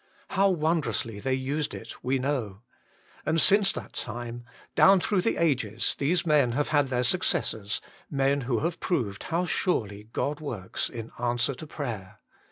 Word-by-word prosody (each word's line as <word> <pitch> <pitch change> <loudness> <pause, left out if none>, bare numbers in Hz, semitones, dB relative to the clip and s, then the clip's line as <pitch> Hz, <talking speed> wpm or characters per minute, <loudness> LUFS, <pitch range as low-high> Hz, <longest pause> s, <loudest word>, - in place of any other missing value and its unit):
How 195 +1 +3
wondrously 150 - 0
they 130 +4 0
used 140 +3 -2
it - - -10
we 130 +2 +1
know. 125 -7 -2 0.6
And 160 +2 +1
since 200 +3 +5
that - - -7
time, 120 0 -5 0.3
down 195 0 +7
through 190 +1 +1
the 230 - 0
ages, 125 -9 +1
these 165 +6 +2
men 145 -7 +4
have 145 +4 0
had 145 -2 +3
their 125 -1 +1
successors, 110 - +1 0.3
men 140 0 +1
who 125 -3 0
have 170 +2 -1
proved 110 - -1
how 170 +2 0
surely 105 - -1
God 145 +4 -1
works 115 -12 -2
in 115 -2 -7
answer 120 +3 +1
to 155 +5 -9
prayer. 110 -9 -5
135 Hz, 160 wpm, -27 LUFS, 115-155 Hz, 0.6 s, down